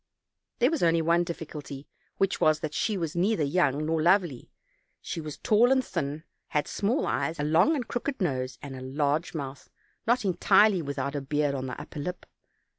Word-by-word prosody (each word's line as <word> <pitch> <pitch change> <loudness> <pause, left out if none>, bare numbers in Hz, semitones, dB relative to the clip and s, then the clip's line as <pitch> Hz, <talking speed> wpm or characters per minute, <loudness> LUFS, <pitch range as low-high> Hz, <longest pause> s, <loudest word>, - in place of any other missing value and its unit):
There 250 +5 +3
was 325 - -1
only 165 -1 +3
one 170 +2 +3
difficulty, 150 -4 -7 0.3
which 195 0 0
was, 155 0 +3
that 155 -1 -4
she 215 +4 0
was 165 -2 -3
neither 180 -1 +2
young 145 -1 +1
nor 160 0 0
lovely; 175 -6 +2 0.5
she 165 - -5
was 150 -2 -7
tall 230 +4 +4
and 260 -2 +3
thin, 145 +2 -3 0.2
had 150 -2 -1
small 215 +7 0
eyes, 165 -1 -1
a - - 0
long 160 - +4
and 250 -6 -3
crooked 260 +2 -3
nose, 130 -8 -1
and 140 -2 -7
a 130 - -8
large 145 +5 -1
mouth, 135 -3 -6 0.4
not 240 -2 +2
entirely 190 +1 +4
without 140 -1 -3
a 145 - -2
beard 145 +1 0
on 130 -1 -3
the 125 - -6
upper - - -8
lip. 180 +5 -5
160 Hz, 190 wpm, -28 LUFS, 145-195 Hz, 0.5 s, tall